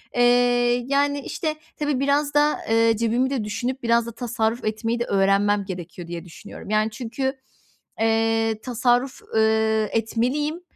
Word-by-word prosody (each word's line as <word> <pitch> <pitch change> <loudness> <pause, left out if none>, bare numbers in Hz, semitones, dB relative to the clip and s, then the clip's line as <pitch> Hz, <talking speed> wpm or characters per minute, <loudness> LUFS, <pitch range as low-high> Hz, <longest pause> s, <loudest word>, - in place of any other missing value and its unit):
Eee, 245 0 +3
yani, 285 +1 +1
işte, 310 +2 -3 0.2
tabii, 290 -3 -1
biraz 285 +1 +1
da, 295 +1 +3
eee, 225 0 +4
cebimi 235 +3 +1
de 265 -5 -2
düşünüp 245 +5 -3
biraz 235 0 +3
da 235 - -6
tasarruf 230 0 -2
etmeyi 225 +2 -1
de 235 - -1
öğrenmem 200 0 +2
gerekiyor, 180 -2 -7
diye 170 +1 -6
düşünüyorum. 180 +4 -11
Yani, 215 +1 +1
çünkü, 250 +4 -3 0.7
eee, 225 0 +1
tasarruf, 245 +1 0
eee, 220 -1 +2
etmeliyim. 255 +9 -1
230 Hz, 140 wpm, -23 LUFS, 220-255 Hz, 0.7 s, eee